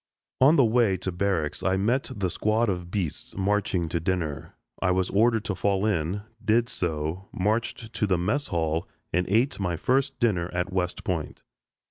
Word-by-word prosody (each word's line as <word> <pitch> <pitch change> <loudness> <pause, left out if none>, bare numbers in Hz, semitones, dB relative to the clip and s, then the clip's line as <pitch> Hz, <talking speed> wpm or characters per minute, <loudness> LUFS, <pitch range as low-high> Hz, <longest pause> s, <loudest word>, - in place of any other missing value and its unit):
On 140 +5 +6
the 135 - +6
way 110 -4 +3
to 95 +1 -3
barracks 90 -4 -1
I 95 0 +1
met 120 +7 +1
the 95 -4 -1
squad 110 +4 +1
of 90 -2 -3
"beasts" 90 -5 -3
marching 95 -3 +1
to 85 - -1
dinner. 80 -4 -2 0.3
I - - +2
was 90 0 +1
ordered 110 +1 +3
to 100 - -1
fall 100 +2 +1
in, 95 0 0 0.2
did 115 +2 +3
so, 85 -2 -3
marched 110 +3 -1
to 105 - 0
the 95 -2 +2
mess 140 +12 0
hall, 80 -3 -1 0.3
and 90 +1 +1
ate 115 +6 +2
my 90 -4 -1
first 130 - +1
dinner 95 -8 +1
at 90 +2 -1
West 90 -1 -1
Point. - - -3
95 Hz, 175 wpm, -26 LUFS, 90-110 Hz, 0.3 s, On